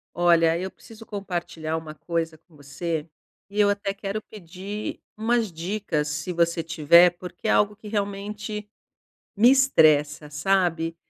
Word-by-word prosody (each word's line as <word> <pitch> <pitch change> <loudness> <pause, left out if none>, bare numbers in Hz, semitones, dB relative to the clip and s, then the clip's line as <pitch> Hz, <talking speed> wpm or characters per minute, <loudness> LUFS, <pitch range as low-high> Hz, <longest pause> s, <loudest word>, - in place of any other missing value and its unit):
Olha, 170 -1 +4
eu 190 +1 -4
preciso 225 +1 -15
compartilhar 175 -6 -4
uma 155 -1 -9
coisa 165 0 -3
com 160 +1 -28
você, 150 +3 -4 0.4
e 205 +1 -7
eu 205 -1 +5
até 200 -1 -2
quero 200 +1 -4
pedir 200 +1 -7 0.2
umas 225 0 +1
dicas, 170 -2 -2
se 150 +4 -3
você 170 0 +1
tiver, 165 +2 +6
porque 180 +4 -7
é - - +4
algo 210 0 +3
que 210 +1 -12
realmente 210 +1 -4 0.7
me 235 +4 +7
estressa, 155 - +4
sabe. 165 0 0
180 Hz, 140 wpm, -25 LUFS, 165-205 Hz, 0.7 s, me